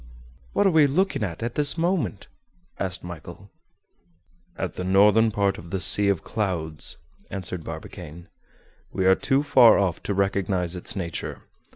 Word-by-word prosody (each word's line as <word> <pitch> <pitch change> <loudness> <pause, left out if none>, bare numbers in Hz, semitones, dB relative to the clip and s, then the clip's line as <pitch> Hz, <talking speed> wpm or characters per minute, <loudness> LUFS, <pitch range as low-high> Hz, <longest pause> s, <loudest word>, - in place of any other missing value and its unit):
"What - - +2
are 195 - +4
we 155 -3 +5
looking 185 +4 0
at, 90 +1 -4
at 120 0 -3
this 145 +3 +2
moment?" 165 - -1 0.5
asked 95 -1 -3
Michel. 85 +3 -10 1.1
"At - - -3
the 90 - -5
northern 105 +4 +4
part 100 -2 0
of 85 - -12
the 95 - -2
'Sea 100 +2 +5
of 100 -4 0
Clouds,'" 85 -7 -1 0.3
answered 90 -3 -4
Barbicane. 80 +1 -9 0.6
"We 95 - -2
are 95 - +6
too 135 +8 +1
far 125 -5 +6
off 95 -4 0
to 100 - -3
recognize 95 -2 0
its 90 - -5
nature. 85 -5 -5
100 Hz, 155 wpm, -24 LUFS, 90-115 Hz, 1.1 s, are